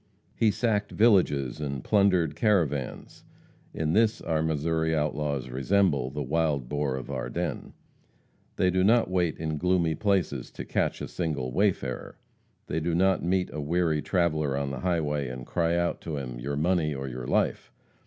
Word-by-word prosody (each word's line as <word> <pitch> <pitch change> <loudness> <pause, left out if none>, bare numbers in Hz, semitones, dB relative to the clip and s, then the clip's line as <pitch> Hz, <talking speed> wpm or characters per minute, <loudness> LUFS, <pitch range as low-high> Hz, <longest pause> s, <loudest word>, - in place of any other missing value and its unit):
He 115 - +3
sacked 105 -1 0
villages 85 - +3
and 70 -3 -3
plundered 95 -7 +3
caravans. 80 - 0 0.5
In 80 0 -1
this 115 +2 +3
our 80 -2 -1
Missouri 80 +1 0
outlaws 75 -3 -1
resemble 70 -1 +1
"The 75 +2 -4
Wild 75 -2 0
Boar 70 -1 -1
of 65 +1 -6
Ardennes." 65 -2 -4 0.8
They 90 -1 +2
do 95 +1 +2
not 115 -1 +4
wait 90 -4 +1
in 80 -2 -3
gloomy 90 -2 +2
places 90 - 0
to - - -7
catch - - -1
a - - -3
single 75 -7 -3
wayfarer; 85 -9 -1 0.5
they 80 - -2
do 80 +1 -1
not 95 +2 +2
meet 90 +1 0
a 75 - -3
weary 80 0 +1
traveller 75 -7 0
on 70 -1 -2
the 65 - -5
highway 75 -4 0
and 60 0 -7
cry 85 0 0
out 85 0 -1
to 80 -3 -4
him, 60 -3 -5
"Your 70 +4 -3
money 80 -2 +1
or 65 0 -4
your 60 -1 -6
life!" - - 0
80 Hz, 165 wpm, -27 LUFS, 70-90 Hz, 0.8 s, not